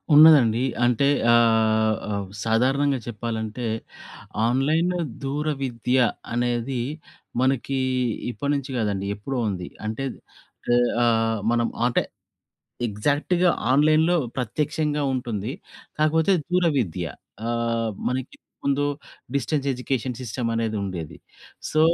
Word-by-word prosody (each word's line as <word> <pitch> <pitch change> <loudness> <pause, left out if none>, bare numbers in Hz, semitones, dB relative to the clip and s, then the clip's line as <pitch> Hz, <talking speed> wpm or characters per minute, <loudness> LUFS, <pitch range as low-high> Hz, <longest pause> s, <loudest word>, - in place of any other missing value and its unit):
ఉన్నదండి. 140 -7 +7 0.2
అంటే 125 +3 +3 0.2
ఆహ్, 110 -2 +4
ఆహ్, 100 -1 -2 0.2
సాధారణంగా 135 +5 +2
చెప్పాలంటే 115 0 -4 0.8
ఆన్లైన్ 155 +8 +2 0.3
దూరవిద్య 135 -3 -1 0.4
అనేది. 120 +1 0 0.6
మనకి 135 +1 +1 0.5
ఇప్పటినుంచి 140 +1 -2
కాదండి 100 -3 -1
ఎప్పుడో 125 +6 -4
ఉంది. 90 -3 -4 0.2
అంటే 110 +5 -3 0.7
ఇ 120 - +5 0.3
ఆహ్, 115 -1 +2
మనం 120 0 +2 0.2
అంటే 125 - +2 0.9
ఎగ్జాక్ట్‌గా 145 - +1 0.2
ఆన్లైన్‌లో 155 +5 +4 0.2
ప్రత్యక్షంగా 150 +4 -1
ఉంటుంది. 120 -2 -3 0.5
కాకపోతే 160 +4 +3 0.2
దూరవిద్య 140 - +1 0.4
ఆహ్, 115 -1 0 0.2
మనకి 130 +1 -3
ఇంతకు - - -62
ముందు 140 +1 +2 0.5
డిస్టెన్స్ 140 +1 0
ఎడ్యుకేషన్ 125 -1 -2
సిస్టమ్ 120 0 -3
అనేది 115 -1 -1
ఉండేది. 85 -5 -6 0.5
సో, 155 - +2
125 Hz, 95 wpm, -24 LUFS, 115-140 Hz, 0.9 s, ఉన్నదండి